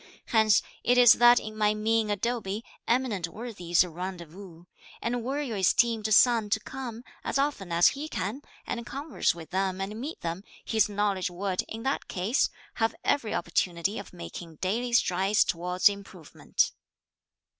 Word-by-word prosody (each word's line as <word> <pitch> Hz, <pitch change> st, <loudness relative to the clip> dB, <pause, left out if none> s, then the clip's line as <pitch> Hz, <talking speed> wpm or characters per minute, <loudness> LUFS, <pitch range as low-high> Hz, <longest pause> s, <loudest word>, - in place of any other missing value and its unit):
Hence 220 Hz, -3 st, +4 dB, 0.2 s
it 245 Hz, +1 st, +3 dB
is 245 Hz, -2 st, +9 dB
that 240 Hz, 0 st, +6 dB
in 215 Hz, 0 st, -8 dB
my 210 Hz, 0 st, +2 dB
mean 220 Hz, 0 st, +1 dB
abode, 210 Hz, 0 st, -2 dB, 0.2 s
eminent 230 Hz, -8 st, 0 dB
worthies 180 Hz, -4 st, 0 dB
rendezvous; 175 Hz, 0 st, -8 dB, 0.4 s
and 240 Hz, 0 st, -2 dB
were 275 Hz, +4 st, -2 dB
your 235 Hz, -7 st, -4 dB
esteemed 220 Hz, +3 st, +2 dB
son 225 Hz, -1 st, +5 dB
to 220 Hz, -, +2 dB
come, 240 Hz, 0 st, -7 dB, 0.2 s
as -, -, -1 dB
often 275 Hz, -10 st, -1 dB
as 170 Hz, +1 st, +5 dB
he 295 Hz, +3 st, -6 dB
can, 205 Hz, -, -3 dB, 0.2 s
and 235 Hz, -, -4 dB
converse 275 Hz, -, -1 dB
with 165 Hz, -2 st, -11 dB
them 190 Hz, 0 st, -1 dB
and 210 Hz, +4 st, -4 dB
meet 300 Hz, +5 st, -6 dB
them, 170 Hz, +3 st, -4 dB, 0.2 s
his 220 Hz, -2 st, +2 dB
knowledge 200 Hz, -2 st, 0 dB
would, 185 Hz, +1 st, -2 dB
in 225 Hz, +1 st, -7 dB
that 270 Hz, +1 st, -1 dB
case, 195 Hz, +9 st, +1 dB, 0.3 s
have 225 Hz, -, +2 dB
every 230 Hz, -7 st, 0 dB
opportunity 175 Hz, +3 st, -1 dB
of 200 Hz, -, -10 dB
making 160 Hz, -, -9 dB
daily 225 Hz, +9 st, -2 dB
strides 195 Hz, -2 st, +3 dB
towards 180 Hz, +2 st, +1 dB
improvement." 200 Hz, -5 st, -2 dB
210 Hz, 155 wpm, -28 LUFS, 185-235 Hz, 0.4 s, is